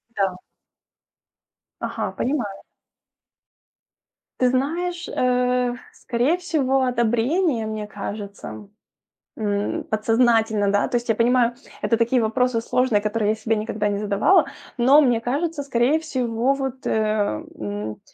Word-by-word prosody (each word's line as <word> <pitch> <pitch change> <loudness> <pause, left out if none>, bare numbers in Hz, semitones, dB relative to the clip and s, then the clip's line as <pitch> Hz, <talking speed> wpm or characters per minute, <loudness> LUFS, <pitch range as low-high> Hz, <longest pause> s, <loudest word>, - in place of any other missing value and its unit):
Да. 190 -2 0 1.4
Ага, - - -3
понимаю. 245 -8 -2 1.8
Ты 250 -1 +4
знаешь, 340 +7 -1
э, 250 0 +1 0.2
скорее 255 +8 0
всего, 270 -7 +1
одобрение, 240 +3 +1
мне 215 -1 -4
кажется, 200 0 -7
м. 205 -1 -9 0.7
М, 205 -2 -1
подсознательно, 220 -1 +2
да, 205 - +2
то 255 - 0
есть 240 0 -3
я 225 - +3
понимаю, 240 +1 +3 0.3
это 230 - +1
такие 235 +2 +2
вопросы 230 +1 +1
сложные, 240 -2 +1
которые 210 0 0
я - - +2
себе 225 +1 0
никогда 210 -1 -2
не 200 -1 0
задавала, 210 - +3 0.3
но 260 +4 +6
мне 245 -6 +3
кажется, 290 +5 -2
скорее 275 +3 +2
всего, 255 -4 0
вот, 265 -1 -4
э, - - 0 0.7
м, 105 0 -5
240 Hz, 120 wpm, -23 LUFS, 215-260 Hz, 1.8 s, но